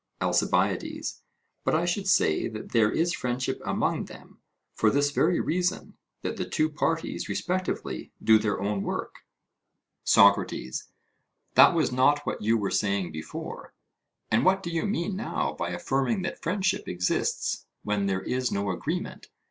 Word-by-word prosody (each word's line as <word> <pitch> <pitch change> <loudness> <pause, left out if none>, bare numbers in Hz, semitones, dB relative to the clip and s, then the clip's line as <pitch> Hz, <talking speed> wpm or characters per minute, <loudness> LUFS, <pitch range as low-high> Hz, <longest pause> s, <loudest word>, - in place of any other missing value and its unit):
ALCIBIADES: - - 0 0.4
But - - +2
I 165 +2 +2
should 190 +3 -1
say 80 - +3
that 110 -1 -8
there 110 -3 +4
is 170 +2 +1
friendship 125 0 -2
among - - 0
them, - - -14 0.3
for 110 - +3
this 145 +3 +2
very 165 +4 +2
reason, 180 +3 -1 0.3
that - - -3
the - - -4
two 155 0 +1
parties 160 +2 -2
respectively 185 0 -3
do 110 -1 +6
their 105 -1 -1
own 100 0 -1
work. - - -4 0.9
SOCRATES: 100 -10 +3 0.7
That - - +7
was 155 -6 +2
not 145 +4 +3
what - - -3
you 110 +2 +3
were 100 -3 -2
saying 95 -2 0
before; 80 0 -7 0.6
and 115 +3 +3
what 190 +3 +3
do 170 - -4
you 165 +4 -1
mean 195 -1 -1
now 195 - -2
by - - -3
affirming 135 +9 -1
that 175 - -4
friendship 190 +3 0
exists 90 0 -1 0.2
when 105 -1 0
there 95 -1 -1
is 125 0 -1
no 100 -1 -1
agreement? 90 - -4
130 Hz, 150 wpm, -27 LUFS, 105-175 Hz, 0.9 s, That